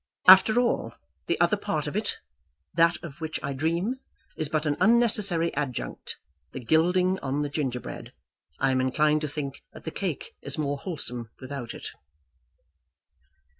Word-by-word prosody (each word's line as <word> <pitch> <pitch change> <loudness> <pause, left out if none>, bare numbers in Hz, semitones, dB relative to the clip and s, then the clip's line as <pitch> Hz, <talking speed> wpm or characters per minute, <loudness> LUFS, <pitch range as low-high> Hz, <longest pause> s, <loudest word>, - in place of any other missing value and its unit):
After 195 +5 +9
all, 235 - 0 0.3
the - - 0
other - - +3
part - - -2
of - - -5
it, - - -2 0.5
that 170 +1 +4
of 165 -1 -9
which 160 0 -3
I 140 -1 -2
dream, 170 - -1 0.4
is 155 -2 -1
but 155 0 0
an 145 -1 +1
unnecessary 210 -7 +4
adjunct; 140 -4 -4 0.4
the - - -5
gilding 180 +8 +2
on 140 +2 -2
the 145 - -1
gingerbread. 135 -4 -4 0.5
I 135 - +2
am 130 0 +2
inclined 150 +4 +2
to 155 - -1
think 145 -2 -5
that - - -12
the 160 - -4
cake 180 -6 -4
is 140 - -4
more 145 -2 -1
wholesome 125 - -5
without 130 -3 -6
it." - - -6
155 Hz, 155 wpm, -27 LUFS, 140-175 Hz, 0.5 s, After